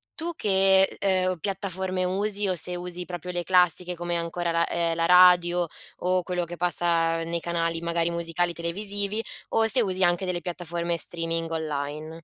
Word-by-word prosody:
tu 335 +1 -4
che, 190 -1 +4 0.2
ehm, 185 -2 +1
piattaforme 190 0 -3
usi 200 +2 -1
o 185 - 0
se 180 +1 -3
usi 180 0 -5
proprio 180 0 -6
le 175 0 -2
classiche 180 -1 +2
come 175 0 -2
ancora 170 0 -2
la, 170 0 +1
ehm, 170 -1 0
la 165 - +1
radio 180 -1 +6 0.3
o 185 0 0
quello 180 -1 -2
che 175 0 -8
passa 170 -1 +1
nei 170 +1 -2
canali 165 -1 -2
magari 170 0 0
musicali 170 +1 -1
televisivi 200 +5 -2 0.3
o 225 0 +2
se 245 +2 +4
usi 190 -2 0
anche 175 +2 +2
delle 175 -1 -2
piattaforme 170 0 -3
streaming 165 -1 -2
online? 155 -1 -4
175 Hz, 165 wpm, -26 LUFS, 170-185 Hz, 0.3 s, radio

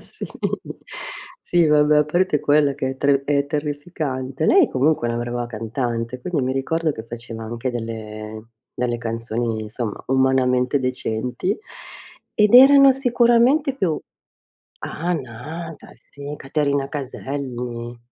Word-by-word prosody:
Sì, - - -4 1.1
sì 175 -2 +2
vabbè, 150 0 +4
a 150 - +4
parte 165 0 +1
quella 150 -1 +3
che 130 -1 -2
è 135 - -7
tre 140 0 +2
è 140 0 +1
terrificante. 145 -3 -3
Lei 370 -6 +5
comunque 130 -2 +1
è - - 0
una 120 - -2
brava 120 0 -3
cantante, 115 +1 -3
quindi 165 0 -1
mi 130 +1 0
ricordo 155 +4 0
che 110 - -8
faceva 115 -1 -7
anche 120 +3 -3
delle 110 -2 -6 0.3
delle 120 -1 -1
canzoni, 115 0 -3
insomma, 110 0 -5
umanamente 130 0 +2
decenti 125 - -2 0.8
ed 210 +1 +4
erano 275 +1 +9
sicuramente 250 +2 +3
più 180 - 0 0.8
ah 175 +3 -2
Nada 160 +4 -7
sì, 145 +1 -9
Caterina 140 -1 0
Caselli. 125 -4 -5
135 Hz, 125 wpm, -22 LUFS, 120-155 Hz, 1.1 s, erano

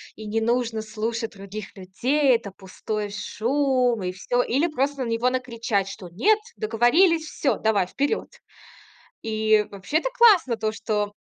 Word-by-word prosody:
и 220 - -9
не 220 +2 -1
нужно 230 -1 0
слушать 225 +1 -3
других 200 +2 -9
людей. 255 +9 +1
Это 220 -4 -4
пустой 205 +2 -5
шум, 250 +2 0
и 180 - -2
всё". 245 +7 0
Или 275 +7 +1
просто 280 -3 -1
на 230 - -4
него 230 +2 +1
накричать, 230 -6 -1
что: 195 -2 -9
"Нет, 415 - +3 0.2
договорились, 315 - +3
всё, 275 -6 -1
давай, 205 -5 +1
вперёд". 285 - -2 0.9
И 215 -1 +2
вообще, 200 +10 -2
это - - -1
классно, 395 - +5
то 220 0 -1
что 210 -1 -2
230 Hz, 150 wpm, -24 LUFS, 210-265 Hz, 0.9 s, классно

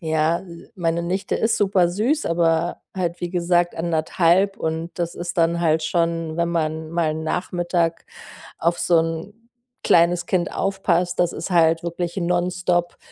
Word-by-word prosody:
ja, 160 0 0 0.3
meine 170 -3 -1
Nichte 190 +3 -1
ist 225 +1 +1
super 195 -4 +3
süß, 240 - 0
aber 165 0 +1
halt, 175 -2 -2
wie 175 - -3
gesagt, 175 -1 +1
1,5 170 +3 +2
und 160 +1 -3
das 170 -1 -2
ist 175 0 -5
dann 170 +1 +2
halt 160 -2 +2
schon 165 -1 -1
wenn 170 0 +1
man 160 -1 -2
mal 165 -2 0
'n 160 - -5
Nachmittag 175 0 -1 0.6
auf 170 +1 +1
so 170 -2 +3
'n 165 +4 -3 0.5
kleines 170 +1 +3
Kind 180 -2 0
aufpasst, 180 -3 0
das 175 -1 +2
ist 165 - -5
halt 165 -1 +4
wirklich 170 +1 -4
nonstop 175 0 0
170 Hz, 150 wpm, -22 LUFS, 165-180 Hz, 0.6 s, halt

